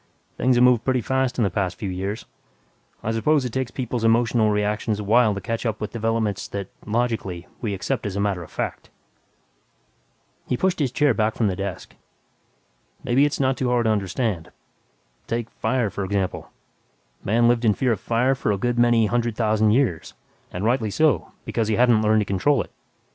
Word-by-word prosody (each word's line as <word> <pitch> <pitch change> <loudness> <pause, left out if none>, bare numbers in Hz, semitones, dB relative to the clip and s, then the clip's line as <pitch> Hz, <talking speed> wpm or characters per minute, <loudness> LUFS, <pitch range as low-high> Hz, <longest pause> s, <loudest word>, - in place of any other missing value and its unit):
Things 130 0 +2
have 120 - +4
moved 125 -2 +4
pretty 130 -2 +1
fast 130 +1 0
in 120 - +2
the 100 - +1
past 95 0 -1
few 105 - -4
years. 95 +4 -4 0.8
I 110 - -1
suppose 135 +5 +2
it 120 - -4
takes 130 -2 -1
people's 120 -2 -3
emotional 115 -1 +3
reactions 105 +1 0
a - - -4
while 110 0 +3
to 100 - -5
catch 115 +5 -3
up 110 -3 -2
with 105 - -4
developments 115 -3 -1
that, 100 -1 -5 0.2
logically, 110 -6 -2 0.2
we 105 -5 -2
accept 105 +4 -2
as 100 0 -4
matter 100 -3 0
of 85 - -10
fact." - - -5 1.6
He 125 - 0
pushed 185 +3 0
his 135 -5 0
chair 145 -2 +3
back 110 -1 0
from 110 -4 +1
the 95 - -2
desk, 100 -1 -6 1.1
"Maybe 130 +4 +3
it's 145 - -2
not 130 -2 +1
too 125 -1 0
hard 120 -1 +2
to 110 - +3
understand. 100 -3 -2 0.8
Take 115 0 -3
'fire' 120 -6 -1
for 100 - -4
example: 95 -1 -2 0.7
Man 120 +3 +3
lived 120 0 +2
in 105 -3 +3
fear 130 -2 +1
of 110 - -1
fire 120 +6 +1
for 125 -4 -1
a 100 - 0
good 120 +4 -1
many 120 -2 +4
hundred 120 +1 0
thousand 110 -1 +2
years 110 - 0 0.4
and 90 +4 -4
rightly 115 -2 +1
so, 125 - +1
because 115 -2 -1
he 110 - +1
hadn't 120 -2 +4
learned 110 0 +3
to - - -1
control 100 +10 +1
it. - - -19
115 Hz, 190 wpm, -23 LUFS, 105-125 Hz, 1.6 s, have